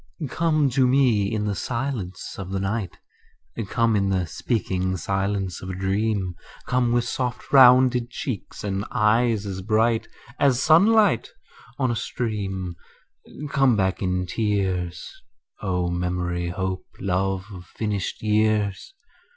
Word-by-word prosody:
Come 155 -3 +2
to 130 +1 +3
me 125 -7 +3
in 105 -1 -1
the 105 - 0
silence 115 -2 -4
of 95 -2 -6
the 95 0 -2
night; 100 -1 -3 0.7
Come 115 +2 +2
in 100 -1 +1
the 95 -2 +1
speaking 95 - -2
silence 95 0 -2
of 95 - -7
a 95 - -4
dream; 95 0 -1 0.3
Come 125 -2 +1
with 120 0 +2
soft 125 +1 -4
rounded 125 -2 +6
cheeks 120 -3 -5
and 100 -1 -2
eyes 110 0 +2
as 95 -1 -4
bright 110 +3 +1 0.3
As 135 -3 +3
sunlight 190 - +4 0.5
on 130 -3 +1
a - - -1
stream; 95 -7 -3 0.8
Come 135 -4 +4
back 95 -2 0
in 90 -1 0
tears, 95 -4 -1 0.5
O 90 -3 -1
memory, 90 0 -2
hope, 95 0 -3
love 95 0 -1
of 90 -2 -10
finished 105 0 -3
years. 105 - +1
105 Hz, 130 wpm, -24 LUFS, 95-120 Hz, 0.8 s, rounded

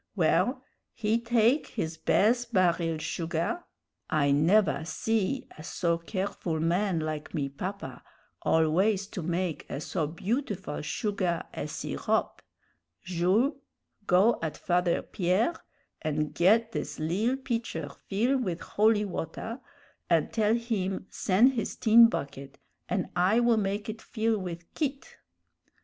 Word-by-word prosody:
Well, - - +2 0.3
he 225 0 +1
take 235 +4 +2
his 165 -7 -3
bez 240 +8 +2
baril 170 -6 +1
sugah 170 - -2 0.5
I 145 -2 +2
nevah 165 +6 +3
see 225 +9 -1
a - - -8
so 170 -1 0
careful 185 -2 -3
man 175 +2 +1
like 155 -1 -4
me 140 -2 -1
papa 185 +9 -6 0.4
always 185 +6 +2
to 190 - -5
make 175 0 -2
a - - -4
so 155 0 -2
beautiful 195 - -3
sugah 185 +1 -1
et - - -4
sirop. - - -2 0.6
'Jules, 185 - +2 0.5
go 195 +6 +4
at 155 -2 -3
Father 175 -1 +1
Pierre 185 - +1 0.5
an' 155 0 -1
ged 220 +6 +4
this - - -4
lill 200 +12 0
pitcher 230 - -3 0.2
fill 240 +7 +2
with 180 -8 -3
holy 210 0 +2
water, 205 - -5 0.5
an' - - +2
tell 220 0 +2
him 210 -6 -2
sen' 215 +8 +4
his 230 -6 -3
tin 230 +1 +7
bucket, 140 -8 -5 0.3
and - - 0
I 190 +6 +3
will 235 -1 +4
make 205 0 -1
it 220 0 -6
fill 225 -1 -1
with 175 -2 -6
quitte.' 275 -3 -3
190 Hz, 130 wpm, -28 LUFS, 165-225 Hz, 0.6 s, tin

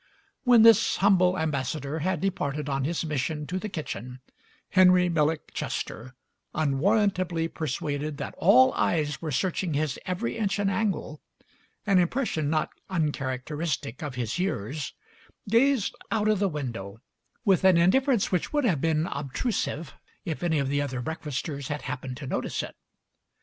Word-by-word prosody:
When 240 -3 +7
this 230 -1 +6
humble 185 -2 +4
ambassador 150 -1 -2
had 185 +3 -1
departed 150 -7 -2
on 135 -1 -1
his 165 +2 -1
mission 150 +1 -2
to 180 +4 -3
the 215 - -5
kitchen 125 - -6 0.5
Henry 180 -1 +5
Millick 155 -1 0
Chester, 130 +4 -4 0.4
unwarrantably 175 +3 +1
persuaded 150 -1 -3
that - - -5
all 130 +1 +6
eyes 150 -4 0
were 160 - -3
searching 175 +2 -1
his 150 -1 -1
every 185 +7 -2
inch 210 -3 0
and 200 -1 +1
angle 190 -8 -2 0.3
— - - -38
an 195 -3 +4
impression 175 - 0
not 155 0 0 0.2
uncharacteristic 145 -3 -2
of 145 -4 -5
his 120 +5 -2
years 150 - -3 0.2
— - - -30
gazed 245 -1 +3
out 215 -1 +1
of 215 -2 +3
the 200 -1 +2
window 115 - -5 0.5
with 190 -2 +3
an 190 -2 +6
in 170 +2 +5
difference 265 -4 +2
which 180 -3 0
would 295 -1 +1
have 170 - +1
been 160 -1 +1
obtrusive 145 - -3 0.3
if 160 - -3
any 170 -3 +1
of 140 -2 0
the 145 +1 +1
other 130 -3 -3
breakfasters 145 -1 -4
had 150 -1 -4
happened 135 -2 -5
to 140 - -7
notice - - -2
it. - - -8
160 Hz, 155 wpm, -27 LUFS, 140-185 Hz, 0.5 s, When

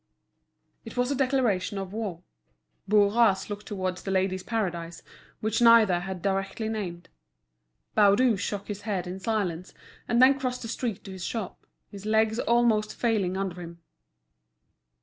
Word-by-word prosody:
It 225 - -10
was 245 +2 +1
a - - +1
declaration 250 -8 +1
of 195 0 -5
war. 200 -6 -4 0.7
Bourras 205 -1 +3
looked 205 0 -6
towards 185 -3 -3
The - - -6
Ladies' 190 0 0
Paradise, 175 -6 -3 0.4
which 220 +2 0
neither 230 -6 +6
had 185 -1 -6
directly 195 +3 -1
named. 180 -6 -5 0.9
Baudu 215 +3 +5
shook 200 +1 -4
his 205 -1 -5
head 200 -4 -2
in 180 +2 -6
silence, 190 -4 -2 0.3
and 235 - +2
then 270 +2 +6
crossed 250 -1 -3
the - - -5
street 230 -2 -3
to 195 - -9
his 190 -2 -7
shop, 220 -2 -5 0.2
his 200 +1 -8
legs 220 +1 +2
almost 235 -3 +2
failing 205 -6 0
under 185 -2 -3
him. 170 0 -9
205 Hz, 150 wpm, -27 LUFS, 185-225 Hz, 0.9 s, neither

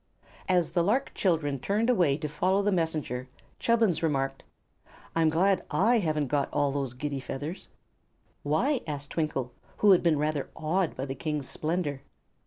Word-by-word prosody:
As 180 -3 +2
the 175 - +2
lark 240 +9 +1
children 155 -7 0
turned 210 - 0
away 175 - +3
to 150 - -3
follow 185 +7 +1
the 205 - +2
Messenger 155 -8 -1 0.3
Chubbins 225 -7 +2
remarked: 135 -4 0 0.7
"I'm 165 -1 +4
glad 185 +5 +2
I 230 +5 +3
haven't 155 -6 0
got 140 0 0
all 145 -1 +1
those 135 -3 -3
giddy 140 +1 -3
feathers." 145 +7 -6 0.7
"Why?" 240 - +1
asked 145 -2 -4
Twinkle, 145 -6 -2 0.3
who 210 - +5
had 185 - +6
been 165 -3 +3
rather 150 -1 -1
awed 170 +3 0
by 130 - -3
the 135 - -4
King's 150 0 -3
splendor. 155 -4 -2
155 Hz, 160 wpm, -28 LUFS, 145-185 Hz, 0.7 s, had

